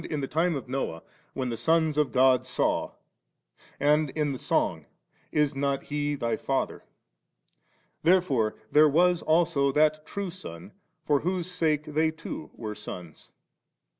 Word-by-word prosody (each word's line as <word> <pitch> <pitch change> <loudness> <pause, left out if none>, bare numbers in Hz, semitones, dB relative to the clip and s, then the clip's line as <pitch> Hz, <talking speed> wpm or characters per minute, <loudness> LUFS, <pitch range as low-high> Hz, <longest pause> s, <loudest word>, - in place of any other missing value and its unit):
the 145 -3 -3
time 165 +3 +1
of 135 - -5
Noah, 125 -11 -3 0.3
*When 130 -2 -2
the 115 - -2
sons 160 +5 +2
of 150 -2 +1
God 130 -1 +4
saw/ 130 0 -1 0.9
and 150 +1 +3
in 150 +1 -1
the 130 - -5
Song, - - 0 0.2
* - - -38
Is 145 -2 +1
not 140 0 -1
He 145 0 -2
thy 115 -4 -1
Father^? 135 -1 -2 0.6
> - - -41
Therefore 155 -11 +2 0.2
there 150 +1 +6
was 175 +3 +3
also 155 -4 +2
that 155 +1 +3
True 200 +2 -5
Son, 90 - -9 0.3
for 145 -2 +2
whose 180 +2 -1
sake 155 -4 +1
they 155 +1 +1
too 160 -1 -7
were 110 -2 -5
sons. 90 -6 -9
150 Hz, 150 wpm, -27 LUFS, 130-160 Hz, 0.9 s, there